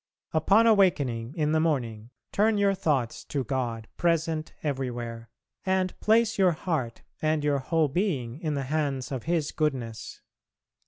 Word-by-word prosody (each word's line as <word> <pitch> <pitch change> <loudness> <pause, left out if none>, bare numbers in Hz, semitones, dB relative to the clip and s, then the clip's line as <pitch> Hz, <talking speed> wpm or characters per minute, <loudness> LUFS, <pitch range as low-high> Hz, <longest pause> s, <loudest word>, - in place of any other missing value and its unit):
Upon 200 +8 +4
awakening 145 - +2
in 150 -2 +1
the 160 - +3
morning, 120 -9 -1 0.2
turn 215 +1 +3
your 200 -1 +3
thoughts 140 -10 -1
to 140 -2 -2
God 120 -3 -3
present 165 -2 0
everywhere, 120 -5 -3 0.3
and 190 -1 +1
place 225 0 +3
your 185 -3 +5
heart 155 -8 -3 0.2
and 155 -1 +1
your 145 -1 +2
whole 160 +3 +1
being 140 - -1
in 155 -3 -2
the 140 - -1
hands 140 -2 -2
of 130 -4 -4
His 165 -3 0
goodness. 130 -8 -3
150 Hz, 145 wpm, -27 LUFS, 125-170 Hz, 0.3 s, your